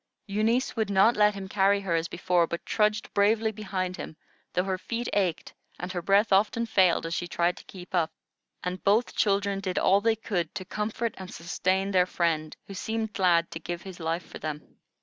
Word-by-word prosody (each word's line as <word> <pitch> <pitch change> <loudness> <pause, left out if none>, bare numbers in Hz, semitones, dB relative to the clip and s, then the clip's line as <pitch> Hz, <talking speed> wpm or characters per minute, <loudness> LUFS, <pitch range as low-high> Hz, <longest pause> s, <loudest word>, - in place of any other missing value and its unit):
Eunice 220 +5 +1
would 220 -3 0
not 200 +4 +5
let 210 0 +4
him 195 -1 -6
carry 200 +1 +3
her 190 -4 -2
as 165 0 +1
before, 175 -1 +1
but 170 - -5
trudged 210 -1 +1
bravely 220 +2 +3
behind 190 -4 -3
him, 155 - -7 0.4
though 180 - +2
her 190 -1 -2
feet 235 +4 -3
ached 185 -5 0 0.2
and 180 +2 -5
her 180 -2 -3
breath 200 +3 +3
often 215 +4 +3
failed 185 -7 +3
as 165 - -3
she 175 - -2
tried 175 0 +1
to - - -12
keep 185 0 -11
up; 165 -3 +1 0.5
and 180 +1 -4
both 215 +5 +2
children 200 -1 +1
did 185 -2 -3
all 195 +1 +4
they 225 +1 +3
could 200 -6 -3
to 190 -2 -5
comfort 215 +4 -2
and 185 -1 -8
sustain 185 +3 -1
their 180 -1 +4
friend, 160 -4 -1
who 195 - -9
seemed 220 +2 -3
glad 170 -3 +3
to 165 - -5
give 175 0 -5
his 190 -2 -9
life 165 +1 -2
for - - -10
them. 150 -1 -6
190 Hz, 205 wpm, -27 LUFS, 175-210 Hz, 0.5 s, not